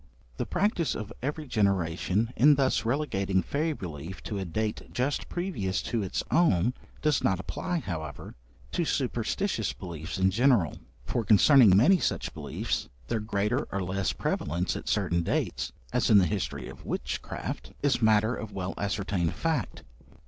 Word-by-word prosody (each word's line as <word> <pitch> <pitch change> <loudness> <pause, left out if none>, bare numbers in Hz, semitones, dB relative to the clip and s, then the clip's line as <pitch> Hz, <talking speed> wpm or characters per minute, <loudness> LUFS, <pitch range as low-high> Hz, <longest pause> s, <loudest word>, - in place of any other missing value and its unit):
The - - -2
practice 180 -3 +1
of 110 +1 -6
every 150 +4 -3
generation 100 - +1
in 145 +4 +6
thus 130 -5 +1
relegating 100 -8 0
fairy 155 +3 -1
belief 80 - -7
to 100 +4 -4
a 95 - -3
date 105 +5 -2
just 130 +4 -1
previous 155 - -2
to 115 - -1
its 95 - -2
own 125 - +3 0.3
does 150 -2 +2
not 95 -1 +2
apply, 170 - -3
however, 80 - -6 0.4
to 175 - 0
superstitious 130 - -1
beliefs 85 -1 -6
in 95 0 +3
general; 115 - +3 0.3
for, 115 - -1
concerning 110 -1 +7
many 185 - +6
such - - -1
beliefs, - - -3 0.2
their 115 - 0
greater 105 +4 -1
or 100 -1 -1
less 95 +1 -1
prevalence 85 +5 -1
at - - -5
certain 85 0 +1
dates 85 - -1 0.2
(as - - +2
in 110 - +7
the 95 - +6
history 80 - -3
of - - -11
witchcraft) - - -4
is 140 -4 +2
matter 110 +1 +4
of 110 -1 -6
well 95 0 -3
ascertained 100 -4 -1
fact. 160 - -2
105 Hz, 155 wpm, -28 LUFS, 95-135 Hz, 0.4 s, concerning